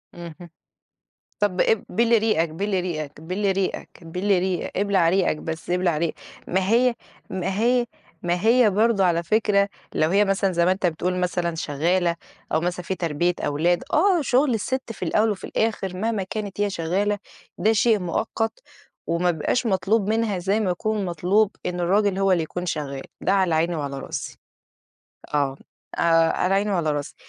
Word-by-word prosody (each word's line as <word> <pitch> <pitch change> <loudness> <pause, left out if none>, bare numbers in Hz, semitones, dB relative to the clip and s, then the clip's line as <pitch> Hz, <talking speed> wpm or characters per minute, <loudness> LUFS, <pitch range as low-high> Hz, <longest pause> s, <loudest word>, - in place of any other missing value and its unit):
اهم، 170 0 -10 0.9
طب 195 -3 +1
إب 225 - +2
بِل 230 0 +3
ريقك، 210 -7 +1
بِل 190 +4 -1
ريقك، 155 -5 -5
بِل 190 +4 -1
ريقك، 190 0 -2 0.2
بِل 180 +5 -4
ريق 185 -1 -1
إبلع 195 -3 +2
ريقك 185 -2 +2
بس، 160 +2 -6
إبلع 180 -3 +1
ريق 165 0 -1 0.3
ما 185 +1 0
هي 245 +1 +4 0.4
ما 190 +1 -2
هي 240 +1 +3 0.4
ما 175 0 0
هي 230 -1 +5
برضه 210 0 +2
على 170 -2 +2
فكرة، 200 +1 +2 0.3
لو 155 - +2
هي 200 +3 +4
مثلًا 195 -1 +1
زي 170 -1 +2
ما 180 - +4
أنت 190 0 -1
بتقول 180 +2 -1
مثلًا 175 -1 -1
شغالة، 170 +3 0 0.4
أو 155 - +2
مثلًا 180 +1 -3
في 190 - -2
تربية 175 0 0
أولاد، 170 +4 +1
آه 360 +1 +4
شغل 260 0 +2
الست 245 +2 -3
في - - -16
الأول 210 +6 +2
وفي 205 - -5
الآخر 200 -4 -1
مهما 220 +1 -1
كانت 205 +1 -5
هي 205 -1 +1
شغالة، 195 +5 -1 0.4
ده 220 - +3
شيء 220 0 +3
مؤقت 225 - -2 0.5
وما 175 +1 +1
بيبقاش 175 +9 -1
مطلوب 200 +1 +1
منها 220 -3 0
زي 195 +5 0
ما 195 -4 0
يكون 210 +3 -1
مطلوب 185 +4 +2 0.2
إن 180 0 -2
الراجل 195 +2 +2
هو 195 -1 +3
اللي 175 -3 +2
يكون 180 +3 -5
شغال، 140 -5 -3 0.2
ده 190 - +1
على 190 -4 +2
عيني 165 +2 +1
وعلى 140 -2 -4
راسي، - - -6 1.0
آه، 140 -2 0 0.4
آآ - - -1 0.3
على 185 +2 0
عيني 205 +2 +1
وعلى 170 -5 +1
راسي، 145 -1 -4
185 Hz, 170 wpm, -23 LUFS, 170-210 Hz, 1.0 s, هي